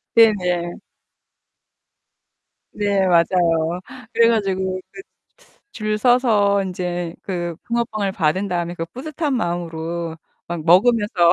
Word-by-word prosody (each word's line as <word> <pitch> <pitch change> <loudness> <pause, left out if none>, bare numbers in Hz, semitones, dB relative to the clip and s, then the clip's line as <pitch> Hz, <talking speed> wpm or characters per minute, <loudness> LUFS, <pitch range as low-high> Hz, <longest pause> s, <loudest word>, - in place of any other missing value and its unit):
네네. 180 -6 +3 2.0
네, 200 -2 +1
맞아요. 170 -1 +2 0.3
그래 230 0 +5
가지고 190 -4 0
그 370 - -10 0.7
줄 215 -1 -2
서서 215 -5 +3
인제 175 -2 -3
그 175 -3 -4
붕어빵을 220 -4 -1
받은 185 +5 0
다음에 175 -1 -2
그 165 - -4
뿌듯한 290 - -3
마음으로 170 -3 -3 0.3
막 170 -2 -5
먹으면서. 195 -2 +4
185 Hz, 210 characters per minute, -21 LUFS, 170-215 Hz, 2.0 s, 그래